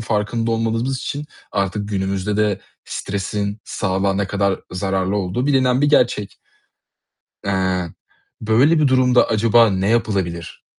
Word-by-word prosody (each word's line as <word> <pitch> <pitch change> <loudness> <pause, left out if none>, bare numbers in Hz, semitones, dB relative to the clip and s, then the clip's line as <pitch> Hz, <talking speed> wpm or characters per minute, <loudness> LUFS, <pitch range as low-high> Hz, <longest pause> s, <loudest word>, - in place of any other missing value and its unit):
farkında 115 +1 -1
olmadığımız 115 +3 0
için 145 +3 -4 0.3
artık 100 +1 -1
günümüzde 95 0 -1
de 105 -2 +1 0.2
stresin 100 +1 -3
sağlığa 95 -1 -1
ne 100 0 0
kadar 100 -1 0
zararlı 95 +1 -1
olduğu 100 +7 -1
bilinen 130 -2 +3
bir 145 - +3
gerçek. 120 -8 +1 1.1
Eee, 95 -3 0 0.5
böyle 125 +9 +3
bir 150 -3 +3
durumda 125 -1 +4
acaba 115 0 +4
ne 95 +1 0
yapılabilir, 95 -8 -1
105 Hz, 120 wpm, -20 LUFS, 95-120 Hz, 1.1 s, durumda